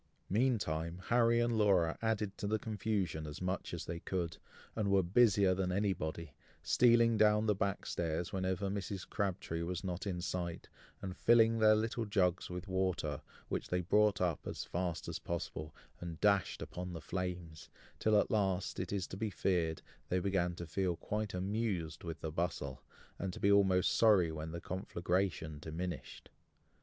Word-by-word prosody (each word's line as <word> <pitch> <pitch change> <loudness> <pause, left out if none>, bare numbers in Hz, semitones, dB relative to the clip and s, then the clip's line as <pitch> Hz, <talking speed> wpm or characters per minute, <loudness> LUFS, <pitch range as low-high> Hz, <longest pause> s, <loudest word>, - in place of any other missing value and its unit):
Meantime 95 -8 0
Harry 115 0 +4
and 120 0 +2
Laura 90 -6 +4
added 105 -3 0
to 100 - -4
the 110 +1 +1
confusion 100 -7 -2
as 75 - -7
much 90 +1 -2
as - - -5
they 85 0 -4
could, 85 -1 -2 0.4
and 105 -3 0
were 100 -1 +4
busier 100 0 +4
than 90 0 -1
anybody, 85 -5 -2 0.3
stealing 115 -2 +5
down 105 0 +4
the 105 - +3
back 100 -1 -2
stairs 85 0 -2
whenever 95 +1 -1
Mrs. 100 -1 -4
Crabtree 95 -4 -2
was 90 +2 -3
not 95 +2 -3
in 90 -3 -2
sight, 85 -1 -3 0.4
and 95 -1 -4
filling 115 +1 +5
their 110 0 +6
little 115 +1 -1
jugs 95 -4 +1
with 90 +2 -6
water, 95 -6 -1 0.3
which - - -3
they 90 0 0
brought 105 +3 +3
up, 90 -4 -1
as - - -4
fast 90 -2 -3
as - - -4
possible, 75 -2 -4 0.3
and 85 -2 -6
dashed 100 -3 +2
upon 90 0 -6
the 80 - -5
flames, 90 -4 -5 0.3
till 110 -1 +4
at - - 0
last, 95 -3 0
it 90 -1 -3
is 100 -2 -1
to 95 - -8
be 110 +1 -1
feared, 85 -4 0 0.3
they 90 - +1
began 90 -2 0
to 85 - -6
feel 90 +2 -1
quite 105 +3 -3
amused 95 -4 -2
with 80 -2 -5
the 80 - -3
bustle, 75 -5 -3 0.4
and 95 - -2
to - - -8
be 100 - +3
almost 95 -2 +4
sorry 100 -7 +5
when 80 0 -5
the 85 +1 -5
conflagration 90 -4 -2
diminished. 80 -3 -6
95 Hz, 170 wpm, -34 LUFS, 85-105 Hz, 0.4 s, their